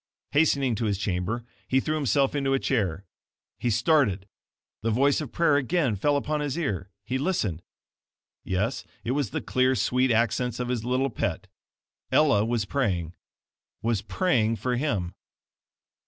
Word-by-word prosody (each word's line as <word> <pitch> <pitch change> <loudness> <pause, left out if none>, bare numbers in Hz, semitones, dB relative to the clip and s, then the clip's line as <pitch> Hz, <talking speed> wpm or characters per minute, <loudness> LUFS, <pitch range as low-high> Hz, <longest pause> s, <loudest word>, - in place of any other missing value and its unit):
Hastening 140 -4 +3
to 115 - -1
his 100 -2 0
chamber 105 +4 -2 0.2
he 130 - +3
threw 155 - -1
himself 140 -2 +2
into 135 -2 +1
a - - +1
chair. 100 -9 -1 0.5
He 120 - 0
started! 115 - +2 0.5
The 115 - 0
voice 135 +7 +3
of 150 - -6
prayer 165 -4 +3
again 145 -4 +1
fell 145 +9 +2
upon 150 +2 -1
his 145 +1 -2
ear. 100 - -2 0.2
He 130 +4 -1
listened. 110 - -1 0.8
Yes, 110 +8 -1 0.2
it 115 - -1
was 140 -4 0
the - - -3
clear, 130 +1 +2
sweet 125 +4 +2
accents 120 +1 +1
of 125 0 -2
his 120 -3 -1
little 130 +2 0
pet. - - -2 0.7
Ella 140 -9 +4
was 115 -1 0
praying 95 - -1 0.7
WAS 115 -3 +1
PRAYING 115 - +1
FOR 125 +2 -1
HIM! 105 - -1
125 Hz, 155 wpm, -26 LUFS, 105-140 Hz, 0.8 s, Ella